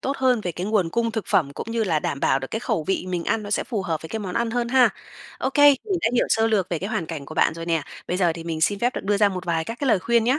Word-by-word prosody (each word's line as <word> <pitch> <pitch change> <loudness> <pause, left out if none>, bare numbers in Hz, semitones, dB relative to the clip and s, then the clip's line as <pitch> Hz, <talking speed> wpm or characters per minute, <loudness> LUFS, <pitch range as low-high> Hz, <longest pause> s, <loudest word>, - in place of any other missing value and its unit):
tốt 275 +1 -2
hơn 255 -3 +2
về 180 -4 -3
cái 175 +3 -4
nguồn 205 -5 +1
cung 230 +4 0
thực 220 -3 -3
phẩm, 140 -6 +2
cũng - - -6
như 230 -1 0
là 165 -6 +1
đảm 140 -2 -3
bảo 135 - +3
được 135 0 -6
cái 220 - -2
khẩu 165 -9 -1
vị 190 0 -1
mình 175 -2 -2
ăn 225 - 0
nó 205 - -7
sẽ - - 0
phù 220 -6 -3
hợp 165 -5 -3
với 160 - -8
cái 220 - -4
món 190 -4 -5
ăn 235 0 0
hơn 240 0 -1
ha. 255 0 +5 0.5
Ô 265 - -1
kê, 290 +1 +6 0.2
mình 390 -4 -1
đã - - +2
hiểu 245 - +3
sơ 225 0 +3
lược 210 -5 +1
về 170 - -1
cái 190 +5 -4
hoàn 165 -6 -2
cảnh 155 -4 -6
của 155 - -9
bạn - - +2
rồi 165 0 -7
nè. 165 -2 +1 0.3
Bây 180 - 0
giờ 175 -3 +2
thì 165 0 -8
mình 165 -2 -3
xin 200 +5 +2
phép 245 +4 0
được - - -5
đưa 205 +1 +2
ra 205 0 +4
một 185 -2 -5
vài 165 -2 0
các 230 +6 -6
cái 280 - 0
lời 220 - +4
khuyên 235 +4 +2
nhá. 255 +5 +2
200 Hz, 345 wpm, -23 LUFS, 170-235 Hz, 0.5 s, kê